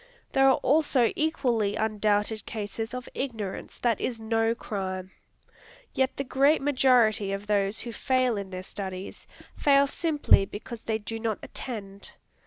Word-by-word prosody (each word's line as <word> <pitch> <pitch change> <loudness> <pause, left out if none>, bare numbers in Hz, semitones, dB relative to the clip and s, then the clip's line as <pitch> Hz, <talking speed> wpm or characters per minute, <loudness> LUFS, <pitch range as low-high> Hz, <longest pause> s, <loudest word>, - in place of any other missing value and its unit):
There 270 0 +4
are 265 - +4
also 275 -4 +3
equally 245 -10 +1
undoubted 215 0 0
cases 225 +2 -4
of 250 - -6
ignorance 220 -8 -5
that 235 -3 0
is 235 -3 -2
no 225 +1 +1
crime. 190 -4 -4 0.8
Yet 265 0 0
the 275 - -1
great 275 +3 +3
majority 250 -7 +3
of 195 +1 -4
those 205 0 +1
who 235 -1 -6
fail 255 +1 +1
in 200 -2 -5
their 185 -1 -6
studies, 190 -1 -7 0.3
fail 280 -1 +4
simply 295 - +3
because 220 +3 -8
they 220 -1 0
do 225 +1 -6
not 220 -2 -1
attend. 200 -5 -7
225 Hz, 145 wpm, -27 LUFS, 205-260 Hz, 0.8 s, There